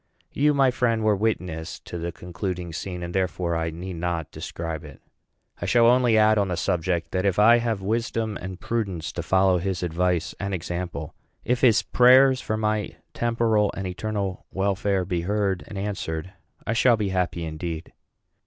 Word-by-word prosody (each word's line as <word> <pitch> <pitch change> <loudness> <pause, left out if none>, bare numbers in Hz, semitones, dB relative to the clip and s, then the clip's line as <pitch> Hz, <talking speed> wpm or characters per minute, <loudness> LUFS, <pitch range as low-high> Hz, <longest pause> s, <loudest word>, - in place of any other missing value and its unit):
You, 150 +1 +3
my 135 -2 +4
friend, 115 -3 +1
were 105 -1 +3
witness 90 -6 -2
to 85 - -7
the 85 +1 -3
concluding 90 0 -5
scene; 90 -1 -5
and, 85 0 -5
therefore, 90 -2 -1
I 80 0 -1
need 85 +2 -6
not 85 -2 -2
describe 80 -2 -5
it. 75 -3 -12 0.6
I 90 - -2
shall 115 +4 +5
only 120 -1 +5
add 110 0 +5
on 100 - +1
the 90 -2 -2
subject, 85 -1 -1
that 95 0 0
if 100 -3 +1
I 115 +3 +6
have 115 -4 -2
wisdom 115 0 -1
and 95 0 -6
prudence 100 -8 -2
to - - -4
follow 95 -1 +3
his 95 0 -2
advice 90 0 0
and 100 -1 -2
example, 85 -2 -5 0.3
if 125 0 0
his 115 -4 +5
prayers 130 +1 +6
for 110 -3 -2
my 110 -1 -1 0.2
temporal 115 -3 +1
and 95 - -3
eternal 100 0 -3
welfare 95 -1 0
be 90 -2 -1
heard 100 0 0
and 100 - -8
answered, 95 -4 -4 0.3
I 115 - 0
shall 120 0 +4
be 105 -2 -1
happy 90 -2 -1
indeed. 80 +1 -5
95 Hz, 175 wpm, -25 LUFS, 85-110 Hz, 0.6 s, I